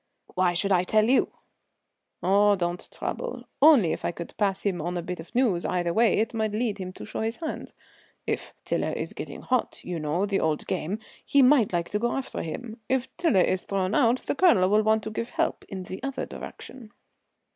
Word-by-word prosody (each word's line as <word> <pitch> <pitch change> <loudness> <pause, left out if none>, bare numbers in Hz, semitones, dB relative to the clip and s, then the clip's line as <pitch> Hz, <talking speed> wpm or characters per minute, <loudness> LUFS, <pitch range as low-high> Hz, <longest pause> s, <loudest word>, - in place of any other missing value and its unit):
"Why 180 -1 +2
should 195 +3 0
I 180 -2 +5
tell 215 +4 +3
you?" 260 +2 +3 0.9
"Oh, 200 +3 +5
don't 175 -1 -3
trouble; - - -5 0.2
only 275 - +7
if - - -6
I - - +1
could 170 0 -8
pass 200 -2 0
him 185 -5 0
on 175 +3 -2
a 175 - -3
bit 180 0 -5
of 160 - -11
news 225 -9 +2
either 175 -2 0
way 230 +1 +4
it 220 +2 0
might 220 -2 -1
lead 215 -2 -1
him 185 -1 -5
to - - -9
show - - -5
his 225 +1 -1
hand. 320 -2 -5 0.5
If - - -3
Tiler - - -1
is - - -4
getting - - -7
'hot' 255 -2 -1
you 175 -2 -4
know 155 +6 0
the 200 -1 0
old 155 -2 0
game 185 +7 -2 0.3
he 280 -1 +4
might 255 -4 +5
like 170 -1 -1
to 210 - 0
go 240 +2 0
after 270 - -3
him. 225 +7 -6
If 260 0 -1
Tiler 330 - +3
is 185 +1 +1
thrown 195 0 -1
out 240 0 +3
the - - -1
Colonel 280 - +4
will 210 +1 +5
want 220 0 +2
to 220 - -5
give 230 +2 -3
help - - -1
in 190 -1 -5
the 185 +1 -7
other 275 0 -3
direction." 235 -4 -10
205 Hz, 210 wpm, -26 LUFS, 180-240 Hz, 0.9 s, only